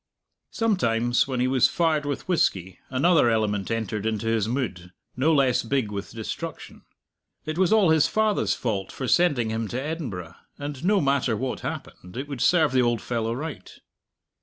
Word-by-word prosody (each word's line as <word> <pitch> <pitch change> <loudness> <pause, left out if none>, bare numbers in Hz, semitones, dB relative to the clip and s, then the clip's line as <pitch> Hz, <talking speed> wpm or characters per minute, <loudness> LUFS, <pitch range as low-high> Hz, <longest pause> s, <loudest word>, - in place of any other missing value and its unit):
Sometimes, 120 - +1
when 130 -2 -2
he 125 - +2
was 130 -1 +4
fired 160 -4 0
with 145 - -4
whisky, 95 - 0
another 145 0 +3
element 105 -3 0
entered 110 -3 -2
into 110 0 -2
his 115 -2 +1
mood, 110 -8 -3 0.2
no 140 +6 +2
less 135 -5 +3
big 120 -3 -1
with 100 -1 -5
destruction. 110 -2 -7 0.6
It 155 +2 -3
was 190 +1 +3
all 210 -6 +5
his 160 -2 +4
father's 215 -1 +1
fault 100 -5 -3
for 130 - -5
sending 140 -11 +2
him 110 0 -2
to 120 +5 -3
Edinburgh, 130 - -5 0.2
and 145 -1 -6
no 200 +2 +3
matter 135 -5 +1
what 130 +2 -3
happened, 90 +5 -7
it 135 +2 -4
would 140 -4 -6
serve 160 -4 +4
the 130 -1 +3
old 120 -2 +1
fellow 115 -1 -2
right! 155 +4 -6
130 Hz, 170 wpm, -25 LUFS, 110-155 Hz, 0.6 s, all